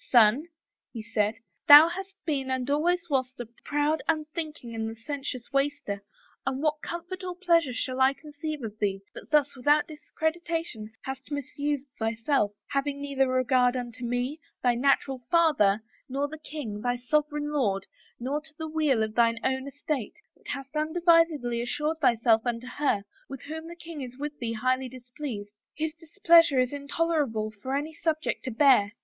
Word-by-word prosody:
* -, -, -21 dB
Son,' 240 Hz, +6 st, +5 dB, 0.4 s
he 225 Hz, -3 st, -6 dB
said, 215 Hz, -1 st, 0 dB, 0.2 s
* -, -, -49 dB
Thou 295 Hz, +1 st, +11 dB
hast 385 Hz, +2 st, -6 dB
been 275 Hz, -4 st, -1 dB
and 260 Hz, -1 st, -1 dB
al 290 Hz, +1 st, +2 dB
ways 350 Hz, +1 st, +1 dB
wast 260 Hz, -4 st, -1 dB
a 240 Hz, -, -4 dB, 0.2 s
proud, 295 Hz, +2 st, +1 dB
unthinking 310 Hz, -5 st, -3 dB
and 220 Hz, 0 st, -2 dB
licentious 250 Hz, +2 st, -5 dB
waster, 275 Hz, -8 st, -1 dB, 0.4 s
and 270 Hz, +2 st, -2 dB
what 305 Hz, 0 st, +1 dB
comfort 345 Hz, +2 st, -6 dB
or 360 Hz, -1 st, -4 dB
pleasure 335 Hz, -6 st, +3 dB
shall 255 Hz, +1 st, -2 dB
I 265 Hz, +1 st, +5 dB
conceive 300 Hz, -1 st, -6 dB
of 215 Hz, -1 st, -6 dB
thee, 195 Hz, -2 st, 0 dB
that -, -, -10 dB
thus 290 Hz, -2 st, +3 dB
without 290 Hz, +4 st, +3 dB
discretion, 320 Hz, -6 st, -3 dB
hast 265 Hz, 0 st, -6 dB
misused 285 Hz, 0 st, -2 dB
thyself, 225 Hz, 0 st, +1 dB, 0.2 s
having 280 Hz, 0 st, -1 dB
neither 275 Hz, -2 st, +1 dB
regard 255 Hz, -1 st, +3 dB
unto 240 Hz, -1 st, -6 dB
me, 245 Hz, +5 st, -2 dB, 0.2 s
thy 245 Hz, -1 st, +4 dB
natural 270 Hz, +1 st, +2 dB
father, 220 Hz, -12 st, +4 dB, 0.3 s
nor 275 Hz, +2 st, -1 dB
the 315 Hz, +1 st, -9 dB
king, 280 Hz, -9 st, -6 dB
thy 245 Hz, +1 st, 0 dB
sovereign 295 Hz, +3 st, 0 dB
lord, 205 Hz, -10 st, 0 dB, 0.3 s
nor 275 Hz, +5 st, -2 dB
to 305 Hz, -1 st, -16 dB
the 320 Hz, -, -4 dB
weal 305 Hz, -7 st, +2 dB
of 215 Hz, 0 st, -3 dB
thine 230 Hz, 0 st, +3 dB
own 265 Hz, +1 st, 0 dB
estate, 285 Hz, -2 st, -3 dB, 0.2 s
but -, -, -20 dB
hast 275 Hz, +1 st, -6 dB
unadvisedly 315 Hz, -6 st, +3 dB
assured 300 Hz, +6 st, -1 dB
thyself 230 Hz, -5 st, +4 dB
unto 240 Hz, 0 st, -2 dB
her, 250 Hz, -5 st, 0 dB, 0.3 s
with 270 Hz, -2 st, -8 dB
whom 320 Hz, +2 st, -6 dB
the 340 Hz, -, -8 dB
king 330 Hz, -3 st, -8 dB
is 250 Hz, -1 st, -7 dB
with 295 Hz, +1 st, -4 dB
thee 230 Hz, -2 st, -2 dB
highly 255 Hz, +3 st, 0 dB
displeased, 245 Hz, -4 st, -7 dB, 0.3 s
whose 315 Hz, 0 st, -1 dB
displeasure 335 Hz, -3 st, +4 dB
is 255 Hz, +2 st, +1 dB
intolerable 280 Hz, -6 st, -1 dB
for 260 Hz, +3 st, -2 dB
any 300 Hz, +3 st, -2 dB
subject 315 Hz, -1 st, -1 dB
to -, -, -3 dB
bear. 230 Hz, -5 st, +4 dB
275 Hz, 170 wpm, -27 LUFS, 245-310 Hz, 0.4 s, Thou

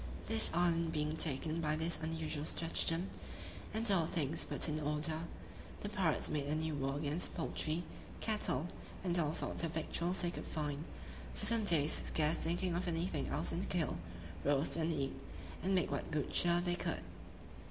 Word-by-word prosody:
This 225 Hz, 0 st, +4 dB
island 170 Hz, -1 st, +3 dB
being 150 Hz, 0 st, +1 dB
taken 155 Hz, +1 st, +1 dB
by 155 Hz, -1 st, +1 dB
this 160 Hz, +1 st, 0 dB
unusual 160 Hz, -2 st, -2 dB
stratagem, 165 Hz, +2 st, 0 dB, 0.6 s
and 220 Hz, 0 st, +1 dB
all 170 Hz, -5 st, +4 dB
things 160 Hz, -2 st, 0 dB
put -, -, +1 dB
in 155 Hz, 0 st, 0 dB
order, 155 Hz, +2 st, 0 dB, 0.6 s
the 205 Hz, -, -2 dB
pirates 185 Hz, -6 st, +2 dB
made 145 Hz, -2 st, -1 dB
a 150 Hz, -, +1 dB
new 160 Hz, 0 st, 0 dB
war 135 Hz, -1 st, 0 dB
against 150 Hz, +3 st, -1 dB
the -, -, -11 dB
poultry, 160 Hz, 0 st, -1 dB, 0.4 s
cattle, 210 Hz, -7 st, 0 dB, 0.4 s
and 175 Hz, -2 st, +2 dB
all 150 Hz, -3 st, +2 dB
sorts 160 Hz, -, -1 dB
of 165 Hz, -1 st, -1 dB
victuals 170 Hz, +3 st, 0 dB
they 175 Hz, -, +2 dB
could -, -, -6 dB
find, 150 Hz, 0 st, -2 dB, 0.5 s
for -, -, -1 dB
some 225 Hz, 0 st, +3 dB
days; 160 Hz, -5 st, +4 dB
scarce 155 Hz, +1 st, +2 dB
thinking 175 Hz, +2 st, +1 dB
of 175 Hz, +2 st, -1 dB
anything 165 Hz, -3 st, 0 dB
else -, -, -1 dB
than 170 Hz, -, -1 dB
to -, -, -3 dB
kill, 170 Hz, -7 st, +1 dB, 0.5 s
roast, 140 Hz, +1 st, +3 dB
and 165 Hz, 0 st, +1 dB
eat, 140 Hz, -4 st, 0 dB, 0.5 s
and 190 Hz, +1 st, +2 dB
make 180 Hz, -5 st, +2 dB
what 140 Hz, -, -2 dB
good 150 Hz, -2 st, -1 dB
cheer 175 Hz, 0 st, +4 dB
they 175 Hz, 0 st, +1 dB
could. 175 Hz, -, -1 dB
165 Hz, 180 wpm, -37 LUFS, 150-175 Hz, 0.6 s, This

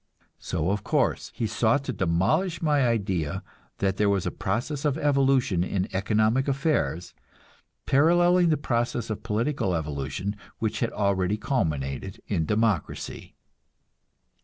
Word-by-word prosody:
So, 85 Hz, +3 st, -1 dB
of 100 Hz, 0 st, -2 dB
course, -, -, 0 dB
he 115 Hz, -, -1 dB
sought 115 Hz, +5 st, +1 dB
to 130 Hz, -, -3 dB
demolish 95 Hz, -, +1 dB
my 145 Hz, -5 st, +2 dB
idea 95 Hz, -9 st, -1 dB, 0.3 s
that 95 Hz, -1 st, 0 dB
there 105 Hz, -1 st, +3 dB
was 100 Hz, -3 st, +1 dB
a -, -, -1 dB
process 120 Hz, +9 st, -2 dB
of 150 Hz, -1 st, +1 dB
evolution 135 Hz, -, +2 dB
in 95 Hz, 0 st, -1 dB
economic 110 Hz, +6 st, +2 dB
affairs, 135 Hz, -, 0 dB, 0.7 s
paralleling 175 Hz, +4 st, +4 dB
the 155 Hz, -, +3 dB
process 120 Hz, -4 st, -1 dB
of 110 Hz, -, -4 dB
political 115 Hz, -2 st, -1 dB
evolution 75 Hz, +6 st, -3 dB, 0.2 s
which 110 Hz, -1 st, -2 dB
had 115 Hz, -, 0 dB
already 100 Hz, -1 st, 0 dB
culminated 80 Hz, -, -2 dB
in 80 Hz, -6 st, -1 dB
democracy. 105 Hz, -5 st, -1 dB
110 Hz, 130 wpm, -26 LUFS, 95-135 Hz, 0.7 s, paralleling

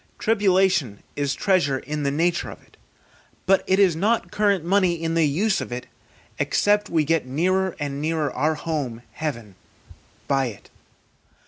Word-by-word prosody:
Tribulation 190 Hz, -, +2 dB
is 145 Hz, -1 st, -1 dB
treasure 175 Hz, -9 st, +2 dB
in 150 Hz, +3 st, -5 dB
the 140 Hz, -, 0 dB
nature 170 Hz, +4 st, 0 dB
of -, -, -10 dB
it, -, -, -25 dB, 0.7 s
but 195 Hz, +1 st, +3 dB
it 190 Hz, -, +3 dB
is 190 Hz, -5 st, +4 dB
not 215 Hz, +7 st, 0 dB
current 200 Hz, -5 st, +1 dB
money 185 Hz, -1 st, +3 dB
in 165 Hz, 0 st, -3 dB
the 165 Hz, -2 st, +3 dB
use 190 Hz, +9 st, +1 dB
of -, -, -6 dB
it, 125 Hz, +1 st, -5 dB, 0.5 s
except 205 Hz, 0 st, +2 dB
we 160 Hz, -2 st, +2 dB
get 160 Hz, -2 st, 0 dB
nearer 185 Hz, +7 st, 0 dB
and 140 Hz, -1 st, -3 dB
nearer 155 Hz, -3 st, -1 dB
our 155 Hz, +4 st, +1 dB
home, 145 Hz, -7 st, -4 dB
heaven, 120 Hz, -10 st, -5 dB, 0.7 s
by 135 Hz, -2 st, +1 dB
it. 105 Hz, -5 st, -11 dB
160 Hz, 155 wpm, -23 LUFS, 140-190 Hz, 0.7 s, is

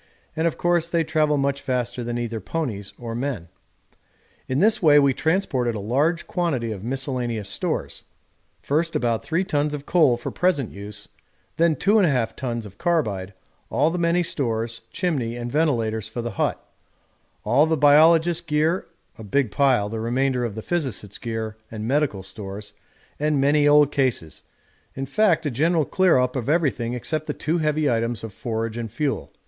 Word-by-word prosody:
and 160 Hz, +1 st, +1 dB
of 165 Hz, -, -2 dB
course 175 Hz, -1 st, +1 dB
they 170 Hz, -1 st, +1 dB
travel 155 Hz, -2 st, +1 dB
much 140 Hz, 0 st, 0 dB
faster 125 Hz, -2 st, -2 dB
than 120 Hz, 0 st, -3 dB
either 115 Hz, -1 st, -3 dB
ponies 105 Hz, -, -4 dB
or 115 Hz, -1 st, -6 dB
men. 120 Hz, -8 st, -3 dB, 1.0 s
In 130 Hz, -, -1 dB
this 215 Hz, +5 st, +3 dB
way 150 Hz, -4 st, +6 dB
we 140 Hz, -2 st, +5 dB
transported 145 Hz, -, 0 dB
a -, -, -3 dB
large 145 Hz, -, 0 dB
quantity 140 Hz, -10 st, -1 dB
of 100 Hz, -3 st, -6 dB
miscellaneous 125 Hz, -4 st, -2 dB
stores; -, -, -3 dB, 0.6 s
first 160 Hz, +3 st, 0 dB
about 115 Hz, -4 st, 0 dB
3 165 Hz, +4 st, 0 dB
tons 150 Hz, -5 st, 0 dB
of 145 Hz, -1 st, -8 dB
coal 155 Hz, -9 st, +4 dB
for 120 Hz, -, -5 dB
present 165 Hz, -, 0 dB
use, 100 Hz, +1 st, -8 dB, 0.5 s
then 165 Hz, -1 st, +3 dB
2 200 Hz, +6 st, +2 dB
1/2 135 Hz, -, +1 dB
tons 120 Hz, -4 st, -4 dB
of 100 Hz, -1 st, -13 dB
carbide, 105 Hz, -, -1 dB, 0.3 s
all 150 Hz, +4 st, +2 dB
the 180 Hz, -, -2 dB
many 170 Hz, +1 st, +2 dB
stores, 115 Hz, -7 st, -2 dB
chimney 125 Hz, -6 st, -1 dB
and 120 Hz, 0 st, -5 dB
ventilators 115 Hz, -9 st, 0 dB
for 115 Hz, +2 st, -5 dB
the 120 Hz, -, -3 dB
hut, 95 Hz, -, -1 dB, 0.9 s
all 130 Hz, +8 st, +4 dB
the 160 Hz, 0 st, +1 dB
biologists' 160 Hz, +4 st, +5 dB
gear 160 Hz, +2 st, 0 dB, 0.3 s
a -, -, -7 dB
big 120 Hz, +2 st, 0 dB
pile, 130 Hz, -6 st, +3 dB
the 110 Hz, +1 st, -4 dB
remainder 125 Hz, +2 st, 0 dB
of 115 Hz, -4 st, -3 dB
the 110 Hz, -, -6 dB
physicists' 130 Hz, -, -3 dB
gear 110 Hz, -2 st, -4 dB
and 110 Hz, 0 st, -5 dB
medical 135 Hz, -8 st, 0 dB
stores, 100 Hz, +1 st, -8 dB, 0.5 s
and 150 Hz, -1 st, +1 dB
many 145 Hz, +2 st, +3 dB
old 145 Hz, -1 st, +5 dB
cases; 125 Hz, -, -1 dB, 0.5 s
in 135 Hz, -, -3 dB
fact 170 Hz, +1 st, +2 dB
a 145 Hz, -, 0 dB
general 160 Hz, +5 st, +2 dB
clear 185 Hz, -3 st, +3 dB
up 125 Hz, +1 st, +1 dB
of 130 Hz, 0 st, -2 dB
everything 125 Hz, -7 st, +1 dB
except 155 Hz, +5 st, -2 dB
the -, -, -1 dB
two 165 Hz, +3 st, -1 dB
heavy 155 Hz, -1 st, +1 dB
items 115 Hz, -2 st, 0 dB
of 110 Hz, -3 st, -7 dB
forage 115 Hz, +2 st, -3 dB
and 115 Hz, -3 st, -5 dB
fuel. 145 Hz, +3 st, -2 dB
135 Hz, 175 wpm, -23 LUFS, 115-160 Hz, 1.0 s, way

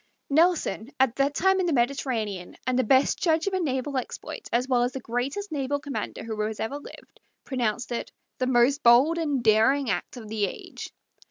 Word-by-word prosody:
Nelson, 300 Hz, -, +2 dB
at 260 Hz, -2 st, +3 dB
that 280 Hz, +1 st, +1 dB
time 380 Hz, +1 st, +3 dB
in 365 Hz, -, +1 dB
the 330 Hz, -, +1 dB
Mediterranean, 235 Hz, -7 st, -1 dB
and 255 Hz, 0 st, +1 dB
the -, -, +3 dB
best 260 Hz, +4 st, +3 dB
judge 320 Hz, -2 st, +2 dB
of 395 Hz, -, -1 dB
a 375 Hz, -, +1 dB
naval 275 Hz, -3 st, -1 dB
exploit 255 Hz, -, -6 dB
as 245 Hz, +2 st, +1 dB
well 250 Hz, -2 st, +2 dB
as 245 Hz, +1 st, 0 dB
the 265 Hz, -, -4 dB
greatest 260 Hz, -, -3 dB
naval 285 Hz, -1 st, -1 dB
commander 285 Hz, -1 st, -5 dB
who 220 Hz, -1 st, -4 dB
has 215 Hz, 0 st, -3 dB
ever 275 Hz, +6 st, -3 dB
lived, -, -, -14 dB, 0.2 s
pronounced 245 Hz, -2 st, -2 dB
it 235 Hz, -, -3 dB, 0.3 s
"the 255 Hz, -, 0 dB
most 260 Hz, +3 st, +3 dB
bold 260 Hz, +8 st, +5 dB
and 290 Hz, -6 st, -1 dB
daring 225 Hz, +3 st, +4 dB
act 250 Hz, -, -4 dB
of 225 Hz, -3 st, -9 dB
the 210 Hz, -1 st, 0 dB
age." -, -, -8 dB
260 Hz, 195 wpm, -26 LUFS, 235-285 Hz, 0.3 s, bold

